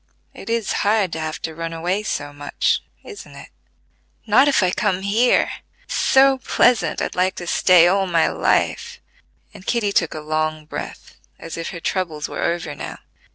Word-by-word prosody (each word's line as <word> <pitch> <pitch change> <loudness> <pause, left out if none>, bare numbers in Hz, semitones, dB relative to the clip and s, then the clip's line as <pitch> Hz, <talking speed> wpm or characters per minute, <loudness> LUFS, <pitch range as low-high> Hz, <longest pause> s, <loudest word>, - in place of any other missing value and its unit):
it - - -10
is 230 -2 -1
hard 205 -4 +1
to 160 - -3
have 155 -1 -4
to 160 - -5
run 165 +1 -5
away 175 +5 -1
so 145 -8 -4
much: 145 0 -1 0.2
isn't 420 -3 -11
it?" - - -12 0.8
"Not 230 +6 +5
if 275 -8 +3
I 180 - +2
come 190 -1 0
here; 220 +5 +2 0.3
it's - - -8
so 270 0 +4
pleasant 250 -1 +2
I'd - - -3
like 185 +1 0
to 175 - -7
stay 175 0 +5
all 195 +1 +2
my 170 -2 +2
life," 470 +1 0 0.5
and 205 -3 -13
Kitty 215 -1 0
took - - 0
a - - -4
long 155 0 -2
breath, - - -8 0.2
as 165 - -8
if 165 - -5
her 170 - -7
troubles 165 -4 -3
were - - -6
over 170 -3 -2
now. - - -7
185 Hz, 180 wpm, -21 LUFS, 160-215 Hz, 0.8 s, Not